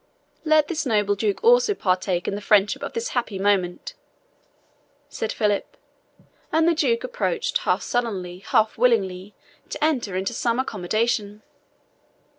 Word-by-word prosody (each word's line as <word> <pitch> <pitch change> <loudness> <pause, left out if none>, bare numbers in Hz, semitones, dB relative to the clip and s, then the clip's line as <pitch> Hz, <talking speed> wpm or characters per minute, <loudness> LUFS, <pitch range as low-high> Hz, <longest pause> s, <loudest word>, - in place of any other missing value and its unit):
"Let 310 -2 +3
this 315 -2 -2
noble 210 -6 +1
Duke 205 0 -2
also 485 -2 +4
partake 185 - -1
in - - -1
the 205 - -4
friendship 205 0 +3
of - - -5
this 465 +1 -3
happy 235 -5 -2
moment," 190 -3 0 1.2
said 220 - -4
Philip; 210 -2 -1 0.7
and 320 +1 +3
the 340 - +4
Duke 255 -7 +1
approached - - -1
half - - 0
sullenly, 190 -7 -3
half 215 +3 +1
willing 200 -5 +1 0.4
to 295 - -4
enter 255 -11 0
into 190 +5 -2
some 235 0 0
accommodation. 215 -1 -1
220 Hz, 135 wpm, -23 LUFS, 195-295 Hz, 1.2 s, also